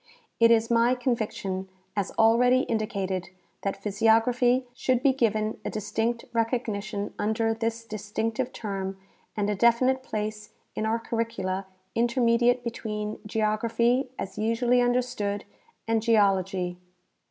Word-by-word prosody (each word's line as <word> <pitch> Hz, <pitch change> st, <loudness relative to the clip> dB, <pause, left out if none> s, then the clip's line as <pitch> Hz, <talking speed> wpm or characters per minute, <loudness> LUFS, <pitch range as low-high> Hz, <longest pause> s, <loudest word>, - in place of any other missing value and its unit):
It 230 Hz, 0 st, +7 dB
is 230 Hz, 0 st, +3 dB
my 235 Hz, +2 st, +4 dB
conviction, 210 Hz, -6 st, -2 dB, 0.3 s
as 200 Hz, -2 st, -1 dB
already 245 Hz, +3 st, +5 dB
indicated, 195 Hz, -6 st, -2 dB, 0.3 s
that 195 Hz, 0 st, -2 dB
physiography 225 Hz, +5 st, +3 dB
should 255 Hz, 0 st, 0 dB
be 275 Hz, -2 st, +5 dB
given 220 Hz, -4 st, 0 dB
a -, -, -2 dB
distinct 225 Hz, +3 st, -2 dB
recognition 215 Hz, -3 st, -2 dB
under 220 Hz, +2 st, +1 dB
this 230 Hz, 0 st, -3 dB
distinctive 220 Hz, +3 st, -3 dB
term 195 Hz, -4 st, -4 dB, 0.4 s
and 205 Hz, -1 st, +1 dB
a 210 Hz, -, +1 dB
definite 235 Hz, +5 st, +3 dB
place 215 Hz, -3 st, -5 dB, 0.2 s
in 215 Hz, -, -2 dB
our 225 Hz, +1 st, +1 dB
curricula 200 Hz, -5 st, -3 dB, 0.3 s
intermediate 240 Hz, 0 st, +2 dB
between 215 Hz, -2 st, -4 dB
geography, 230 Hz, +4 st, +1 dB
as 190 Hz, +2 st, -5 dB
usually 240 Hz, +3 st, +2 dB
un 245 Hz, 0 st, +2 dB
derstood, 210 Hz, -5 st, -1 dB, 0.4 s
and 225 Hz, -1 st, +2 dB
geology. 195 Hz, -5 st, +2 dB
225 Hz, 120 wpm, -27 LUFS, 210-235 Hz, 0.4 s, It